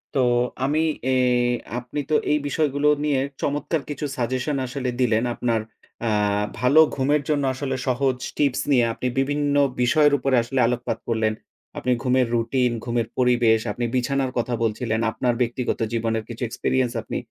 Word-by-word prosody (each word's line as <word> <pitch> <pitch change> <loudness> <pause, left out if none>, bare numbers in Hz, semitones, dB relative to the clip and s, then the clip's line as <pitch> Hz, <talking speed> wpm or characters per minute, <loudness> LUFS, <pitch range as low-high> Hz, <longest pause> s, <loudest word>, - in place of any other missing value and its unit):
তো, - - +2 0.5
আমি 150 +3 +1 0.3
এ - - +3 0.7
আপনি 125 +4 -6
তো - - 0 0.2
এই 150 - +4
বিষয়গুলো 145 -1 0 0.2
নিয়ে 145 -3 +1 0.2
চমৎকার 145 +2 -1
কিছু 145 0 -4
সাজেশন 130 +3 -1
আসলে 130 0 -3
দিলেন। 115 -3 +2
আপনার 115 -2 0 0.5
আ - - +2 0.5
ভালো 125 +6 +4 0.2
ঘুমের 140 +2 +2
জন্য 145 -2 +1
আসলে 130 0 -3
সহজ 130 0 +1 0.2
টিপস 140 -2 +1
নিয়ে 125 -4 +4
আপনি 125 - -3
বিভিন্ন 145 +1 0 0.3
বিষয়ের 145 +4 +4
উপরে 135 0 +1
আসলে 130 +3 -2
আলোকপাত 120 -2 -2
করলেন। 110 -2 +1 0.4
আপনি 125 - -1
ঘুমের 130 -1 +2
রুটিন, 125 +2 +1
ঘুমের 120 -2 -1
পরিবেশ, 120 -3 +3
আপনি 120 +4 -3
বিছানার 130 +1 0
কথা 120 +1 -1
বলছিলেন, 110 0 -1
আপনার 120 +2 0
ব্যক্তিগত 120 +1 -1
জীবনের 115 -1 -1
কিছু 120 +1 -8
experience 125 +1 0
আপনি - - -5
125 Hz, 155 wpm, -23 LUFS, 120-140 Hz, 0.7 s, এই